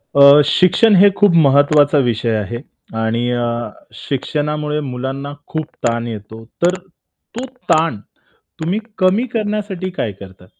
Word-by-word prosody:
अ, 140 +1 +8
शिक्षण 190 +7 +4
हे 200 +2 +7
खूप 205 -2 +5 0.2
महत्त्वाचा 145 +1 +4
विषय 115 -1 -1
आहे 105 +2 -3 0.4
आणि 115 +2 -1
अ, 120 -1 -1 0.5
शिक्षणामुळे 150 +2 -3
मुलांना 135 +3 -5
खूप 155 -1 -4 0.2
ताण 115 0 -2
येतो, 110 0 -8 0.2
तर 180 +1 +2 0.6
तो 245 +3 -4 0.3
ताण 155 -9 +2 0.6
तुम्ही 175 +6 -1 0.2
कमी 190 +6 +2
करण्यासाठी 205 -4 -3
काय 175 - -3
करता? 95 -1 -14
145 Hz, 125 wpm, -17 LUFS, 120-185 Hz, 0.6 s, अ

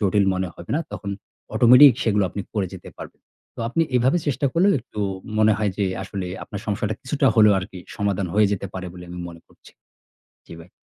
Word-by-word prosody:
জটিল 100 0 +2
মনে 95 -1 -2
হবে 85 - -11
না। 165 - 0
তখন 100 -1 -5 0.4
automatic 125 +3 +8
সেগুলো 105 -3 +2
আপনি 100 - -5
করে 100 -3 0
যেতে - - -11
পারবেন। - - -10 0.4
তো - - -7
আপনি 165 +7 +1
এভাবে 130 +8 +3
চেষ্টা 140 0 0
করলে, 180 +4 +3
একটু 105 - -8 0.4
মনে 110 0 +5
হয় 105 -2 0
যে, 100 - +2 0.2
আসলে 95 -1 -5 0.2
আপনার 100 - -7
সমস্যাটা 105 0 -1
কিছুটা 140 +2 0
হলেও 105 -2 +6
আরকি 95 0 -7 0.2
সমাধান 100 -2 -1
হয়ে 105 -1 +4
যেতে 100 0 -3
পারে 95 0 -5
বলে 90 -1 -10
আমি 90 - -7
মনে 85 -1 -12
করছি। - - -20 0.8
জি, - - -9
ভাই। 85 - -15
105 Hz, 200 wpm, -22 LUFS, 95-120 Hz, 0.8 s, automatic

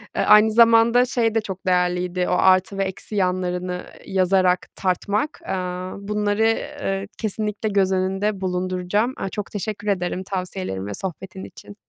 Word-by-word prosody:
Eee, - - +1
aynı 210 +1 +6
zamanda 230 +2 +5
şey 230 -3 0
de 225 - +3
çok 190 -3 -7
değerliydi. 180 0 +1
O - - +1
artı 185 +2 +3
ve 195 - +1
eksi 190 +3 -6
yanlarını 180 -1 -1 0.2
yazarak 185 -1 +2
tartmak, 205 - -1
aaa, 185 - -3
bunları, 210 +2 +1 0.3
ııı, 195 0 -1
kesinlikle 215 0 -2
göz 195 -2 +2
önünde 190 +2 -1
bulunduracağım. 185 +5 -1
Aaa, 195 - -3
çok 210 +1 -6
teşekkür 210 0 -5
ederim 185 -1 -1
tavsiyelerin 185 - -4
ve 105 - -4
sohbetin 190 - -6
için. 205 - -12
190 Hz, 145 wpm, -22 LUFS, 180-210 Hz, 0.3 s, aynı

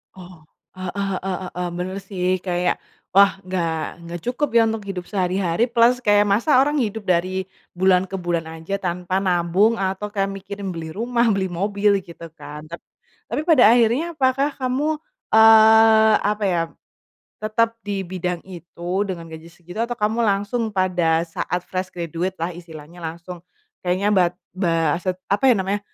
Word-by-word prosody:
Oh, 175 -4 -13 0.3
heeh 185 -1 -4 0.3
heeh 190 -1 -3 0.2
heeh, 180 0 -3
bener 185 +2 -4
sih 190 -2 -5 0.2
kayak 180 0 0 0.4
wah 200 0 +7
nggak 175 -3 -1 0.3
nggak 170 0 -6
cukup 255 +5 -1
ya 230 - +7
untuk 220 -2 -4
hidup 185 -3 -5
sehari-hari 185 +1 0
plus 240 +1 +5
kayak 205 0 +5
masak 230 +9 +3
orang 295 +2 +1
hidup 220 -2 -2
dari 185 +1 0 0.3
bulan 185 0 +3
ke 195 - -7
bulan 175 -3 -2
aja 165 +5 -5
tanpa 180 0 -2
nabung 185 +3 +2
atau 195 +2 -2
kayak 195 -1 0
mikirin 195 0 -6
beli 160 -2 -6
rumah, 235 +2 0
beli 190 -1 -1
mobil 200 +3 +1
gitu 170 0 -10
kan. 145 +1 -8
Tap 170 - -7 0.5
tapi - - -2
pada 260 -9 +6
akhirnya 255 +9 +1
apakah 275 +1 +1
kamu, 275 +4 -1 0.4
eee, 220 0 +7
apa 210 0 0
ya 175 -3 +1 0.8
tetap 225 +2 +1
di 200 -1 -2
bidang 180 -1 -3
itu 175 +1 -5
dengan 170 -3 -5
gaji 160 +1 -10
segitu 175 +3 -12
atau 240 0 -4
kamu 215 +2 0
langsung 205 +3 0
pada 180 -4 +1
saat 175 +1 -3
fresh 185 0 -3
graduate 175 +2 -4
lah 165 - 0
istilahnya 165 -1 -12
langsung 170 +2 -7 0.4
kayaknya 185 +3 +1
bat 180 -2 +3 0.2
ba 165 -4 +1
set 185 0 -2
apa 205 +7 0
ya - - +3
namanya 195 +2 -1
190 Hz, 160 wpm, -22 LUFS, 175-215 Hz, 0.8 s, wah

